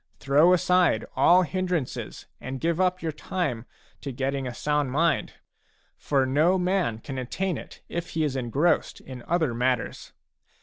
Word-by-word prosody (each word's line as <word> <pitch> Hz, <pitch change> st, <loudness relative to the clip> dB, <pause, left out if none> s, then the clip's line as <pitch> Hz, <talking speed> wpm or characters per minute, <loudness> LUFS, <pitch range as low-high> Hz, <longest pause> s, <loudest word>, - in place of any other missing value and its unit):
Throw 145 Hz, +6 st, +4 dB
aside 180 Hz, 0 st, +3 dB
all 180 Hz, +2 st, +5 dB
hindrances 180 Hz, -5 st, -3 dB
and 130 Hz, 0 st, -6 dB
give 170 Hz, +3 st, 0 dB
up 185 Hz, -1 st, +1 dB
your 160 Hz, -, -1 dB
time 145 Hz, -7 st, -3 dB, 0.3 s
to 140 Hz, -, -5 dB
getting 135 Hz, +1 st, -2 dB
a 125 Hz, -, -5 dB
sound 150 Hz, -2 st, 0 dB
mind; 165 Hz, +5 st, +1 dB, 0.6 s
for 135 Hz, -2 st, 0 dB
no 155 Hz, +8 st, +3 dB
man 180 Hz, -, 0 dB
can 130 Hz, +3 st, -6 dB
attain 180 Hz, +9 st, -2 dB
it -, -, -10 dB
if 170 Hz, 0 st, -4 dB
he 160 Hz, -, +2 dB
is 145 Hz, -3 st, -1 dB
engrossed 135 Hz, +7 st, 0 dB
in 130 Hz, -2 st, -10 dB
other 160 Hz, -7 st, +1 dB
matters. 125 Hz, +1 st, -1 dB
150 Hz, 150 wpm, -26 LUFS, 130-175 Hz, 0.6 s, all